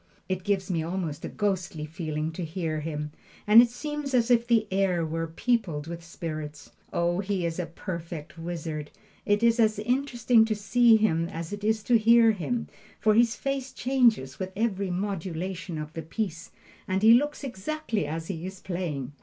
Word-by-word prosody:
It 185 -1 -2
gives 195 -1 0
me 165 -2 0
almost 165 -3 -3
a - - -4
ghostly 185 -7 -2
feeling 155 -1 -3
to 175 +2 -5
hear 160 -1 -3
him, 150 -1 -4 0.3
and 215 +3 +9
it 240 - +3
seems 290 +2 -4
as 240 0 +3
if 235 -1 +4
the 230 -2 +3
air 190 -3 +1
were 165 +1 -2
peopled 170 -4 -1
with 170 +1 -7
spirits. 155 -3 -7 0.2
Oh, 175 +1 +1
he 195 -2 -1
is 165 +1 -2
a 175 - -2
perfect 170 -3 -7
wizard! 165 -3 -5 0.4
It 205 +2 +2
is 230 0 +4
as 220 -2 +3
interesting 240 0 +2
to 220 -1 -1
see 225 +3 +4
him 170 -6 +1
as 165 +3 -6
it 205 0 -6
is 220 0 +1
to 240 -2 +4
hear 230 +1 +6
him, 225 +4 -2 0.3
for 215 - +4
his 235 +1 +4
face 275 -1 -3
changes 235 - +2
with 185 0 -3
every 200 -3 0
modulation 185 -1 -3
of 150 0 -6
the 165 - -4
piece, 170 0 -4 0.4
and 190 +2 0
he 225 +1 +9
looks 290 +4 +2
exactly 235 - -3
as 160 +2 -4
he 165 -2 -5
is 190 0 -8
playing. 165 -9 -4
190 Hz, 180 wpm, -27 LUFS, 165-225 Hz, 0.4 s, and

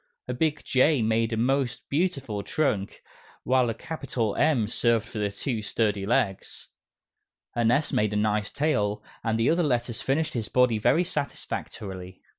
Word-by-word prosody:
A - - -2
big 160 -2 0
J 130 -1 +3
made 115 +1 +1
a 110 - -1
most 130 +2 0
beautiful 140 - -1
trunk, 105 -5 -1 0.4
while 130 -2 +3
a 115 - -2
capital 130 -9 -3
M 145 -8 +3
served 115 0 +1
for 105 -3 -2
two 110 +3 -3
sturdy 105 -2 0
legs. 100 -4 -1 0.9
An 120 -1 +2
S 140 +5 +1
made 105 0 +1
a - - -1
nice 105 0 +1
tail, 105 -9 0 0.2
and 110 -1 0
the 115 - +3
other 170 +2 +2
letters 120 -6 0
finished 155 +4 0
his 115 -4 -3
body 125 -3 +3
very 165 +10 +3
satisfactorily. 95 - -5
115 Hz, 155 wpm, -26 LUFS, 105-140 Hz, 0.9 s, J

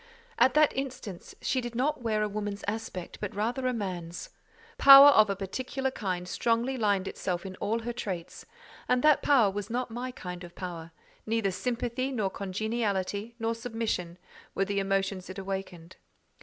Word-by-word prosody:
At 260 - +5
that 305 -1 +4
instant 255 -9 -6
she 260 - +1
did 240 -1 -6
not 275 +3 0
wear 215 -2 0
a - - +1
woman's 205 -1 -4
aspect, 205 -4 -5
but 205 -2 -4
rather 240 +5 -1
a - - +2
man's. 180 -7 -5 0.5
Power 275 +1 +11
of 215 -7 +6
a 200 - 0
particular 260 +7 -3
kind 185 -6 -3
strongly 235 +6 0
limned 205 -5 +1
itself 180 -1 -3
in 190 -1 -6
all 225 +3 -1
her 240 +1 -4
traits, 185 -8 -5 0.5
and 250 0 +2
that 305 -2 +5
power 245 -9 +4
was 205 0 -5
not 245 +1 -2
my 245 +2 -4
kind 180 -7 -7
of 175 0 -11
power: 170 -3 -6 0.4
neither 220 -3 +1
sympathy, 245 +5 -2
nor 215 -7 -1
congeniality, 205 +1 -2
nor 225 -1 -1
submission, 225 -7 -3 0.4
were 195 - +1
the 200 0 -1
emotions 195 -1 -1
it 185 - -7
awakened. 190 -3 -6
210 Hz, 170 wpm, -29 LUFS, 190-245 Hz, 0.5 s, Power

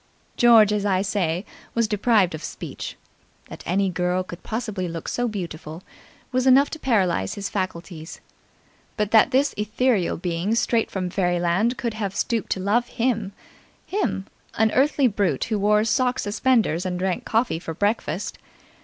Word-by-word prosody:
George, 225 -3 +6
as 210 -1 0
I 195 -2 +1
say, 185 -3 -1 0.3
was 230 -1 +2
deprived 210 -3 +2
of 155 - -6
speech. - - -6 0.5
That - - -9
any 195 +3 +2
girl 180 +1 0
could 175 -1 -10
possibly 215 -5 -3
look 165 -1 -6
so 245 0 -1
beautiful 170 -5 -6 0.5
was 255 +1 +1
enough 270 +2 +6
to 315 - -6
paralyse 185 - +1
his 200 -1 -4
faculties; 175 -4 -5 0.8
but 210 -1 0
that 225 +2 +6
this 270 +2 +2
ethereal 215 -2 +1
being 175 +5 -1
straight 230 -1 +1
from 185 -2 -3
Fairyland 180 +5 +1
could 235 -3 -2
have 205 -3 -4
stooped 230 -3 -1
to - - -7
love 215 +6 +1
him 225 -5 -1 0.5
him 375 - -2 0.3
an 220 0 +3
earthy 280 +1 +3
brute 200 - +1
who 215 -2 -1
wore 210 +1 +3
sock 250 +2 +1
suspenders 210 -5 +1
and 180 -1 -2
drank 185 0 -1
coffee 225 -7 0
for 165 -1 -6
breakfast 205 +6 -1
205 Hz, 155 wpm, -23 LUFS, 180-230 Hz, 0.8 s, George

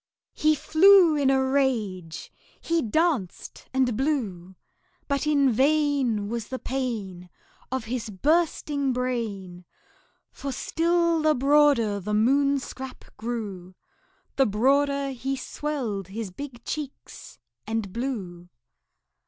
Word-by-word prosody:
He 310 0 +2
flew 345 +2 +6
in 280 -2 +2
a 265 0 +3
rage 220 - -1 0.3
he 335 0 0
danced 275 - -1
and 260 -3 +1
blew; 210 - -2 0.5
But 280 +1 -1
in 280 -3 +3
vain 270 -5 +1
Was 230 0 -4
the 260 - -4
pain 215 -10 -4 0.4
Of 260 -3 -2
his 230 -1 -4
bursting 290 - 0
brain; 215 -8 -3 0.7
For 280 - -6
still 335 +3 +1
the 310 0 +3
broader 275 -6 +3
the 210 +2 -2
Moon 275 +6 +3
scrap 265 -1 -8
grew, 210 -5 -5 0.6
The 270 - +4
broader 275 +6 +2
he 265 +1 -3
swelled 255 - -4
his 205 0 -6
big 245 +2 -9
cheeks 295 -3 -7 0.3
and 220 -4 -3
blew. 195 -9 -5
260 Hz, 110 wpm, -25 LUFS, 210-285 Hz, 0.7 s, flew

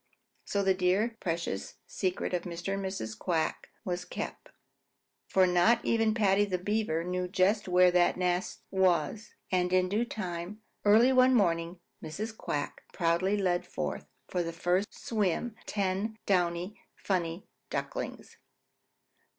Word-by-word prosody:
So 200 -1 0
the 190 0 +4
dear, 190 +5 +1
precious 170 - -3
secret 185 -1 -2
of 180 - +1
Mr. 175 +2 -4
and 195 0 -2
Mrs. 190 - -4
Quack 160 +5 -1 0.2
was 180 -1 -2
kept, - - -6 0.8
for 190 -1 +4
not 180 +7 +3
even 225 -1 +2
Paddy 205 -2 +4
the 190 -3 -1
Beaver 185 -4 -1
knew 180 +1 -2
just 190 +3 +2
where 180 0 +5
that 175 0 +3
nest 180 0 -1
was, 190 +1 +1 0.2
and 180 -1 +1
in 185 0 +3
due 210 +4 +1
time, 190 -1 -5 0.2
early 225 +5 +6
one 255 0 +6
morning, 170 -4 +1 0.2
Mrs. 210 +8 -5
Quack 145 -8 -3
proudly 175 +4 +1
led 180 -3 +1
forth - - -4 0.2
for 180 - -1
their 165 -1 -3
first 180 +4 +1
swim 215 +1 -1
ten 200 +2 -1
downy, 180 +1 0
funny 175 -2 -2 0.2
ducklings. - - -5
185 Hz, 135 wpm, -30 LUFS, 175-205 Hz, 0.8 s, early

